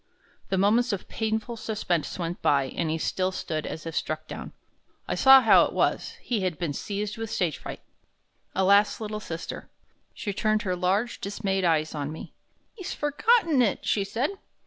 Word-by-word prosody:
The 190 Hz, -, +1 dB
moments 225 Hz, +6 st, +3 dB
of 195 Hz, -, -4 dB
painful 220 Hz, +1 st, -2 dB
suspense 205 Hz, -8 st, -2 dB
went 175 Hz, -1 st, -4 dB
by, 140 Hz, -2 st, +2 dB
and 165 Hz, -, -1 dB
he 160 Hz, -, 0 dB
still 185 Hz, +3 st, -1 dB
stood 155 Hz, -4 st, -3 dB
as 160 Hz, -, -6 dB
if 165 Hz, -1 st, -5 dB
struck -, -, -2 dB
down. -, -, -7 dB, 0.6 s
I -, -, -1 dB
saw 265 Hz, 0 st, +8 dB
how 225 Hz, -, +7 dB
it -, -, -5 dB
was; -, -, 0 dB
he 230 Hz, -5 st, -1 dB
had 180 Hz, -4 st, -1 dB
been 160 Hz, -3 st, -2 dB
seized 205 Hz, +7 st, -4 dB
with 225 Hz, -1 st, -4 dB
stage 175 Hz, -9 st, -1 dB
fright. -, -, -7 dB, 0.7 s
Alas, 200 Hz, +2 st, +4 dB
little 215 Hz, -1 st, -4 dB
sister! 165 Hz, -5 st, -6 dB, 0.5 s
She 205 Hz, -, -4 dB
turned 215 Hz, +1 st, +1 dB
her 185 Hz, -3 st, -1 dB
large, 195 Hz, +6 st, 0 dB
dismayed 195 Hz, -1 st, -1 dB
eves 160 Hz, -2 st, +2 dB
on 145 Hz, -1 st, -3 dB
me. 160 Hz, -, -9 dB, 0.4 s
"He's 380 Hz, -6 st, -6 dB
forgotten 310 Hz, -, +3 dB
it," 220 Hz, -5 st, +1 dB
she 200 Hz, -, +1 dB
said. 235 Hz, -, -1 dB
200 Hz, 175 wpm, -26 LUFS, 170-225 Hz, 0.7 s, saw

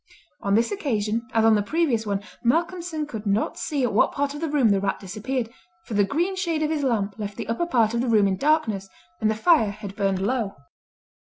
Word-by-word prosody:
On 200 Hz, 0 st, +1 dB
this 230 Hz, +2 st, +2 dB
occasion, 230 Hz, -, -1 dB
as 225 Hz, -1 st, +3 dB
on 225 Hz, -, +6 dB
the 210 Hz, -, +3 dB
previous 240 Hz, -3 st, 0 dB
one, 200 Hz, 0 st, -1 dB, 0.2 s
Malcolmson 335 Hz, +3 st, 0 dB
could 220 Hz, -7 st, -6 dB
not 200 Hz, +2 st, 0 dB
see 285 Hz, -3 st, -1 dB
at 245 Hz, -, 0 dB
what 210 Hz, -, +4 dB
part 285 Hz, 0 st, -1 dB
of 295 Hz, -, -7 dB
the 325 Hz, -, -1 dB
room 280 Hz, -6 st, +3 dB
the 200 Hz, -1 st, +3 dB
rat 195 Hz, 0 st, -1 dB
disappeared, 225 Hz, +5 st, -4 dB, 0.3 s
for -, -, -7 dB
the 205 Hz, 0 st, +4 dB
green 340 Hz, -, 0 dB
shade 335 Hz, -4 st, -1 dB
of 305 Hz, -, 0 dB
his 310 Hz, -2 st, 0 dB
lamp 220 Hz, -6 st, -1 dB
left 205 Hz, -1 st, -5 dB
the -, -, -5 dB
upper 230 Hz, +10 st, -1 dB
part 230 Hz, -7 st, +2 dB
of 235 Hz, -, +1 dB
the 250 Hz, -, -1 dB
room 210 Hz, -3 st, +4 dB
in 190 Hz, -, +1 dB
darkness, 225 Hz, -8 st, +1 dB, 0.3 s
and 215 Hz, -, +2 dB
the 220 Hz, -, +1 dB
fire 260 Hz, -2 st, +4 dB
had 200 Hz, -1 st, -8 dB
burned 195 Hz, -2 st, +1 dB
low. 210 Hz, 0 st, -1 dB
230 Hz, 230 wpm, -24 LUFS, 205-295 Hz, 0.3 s, on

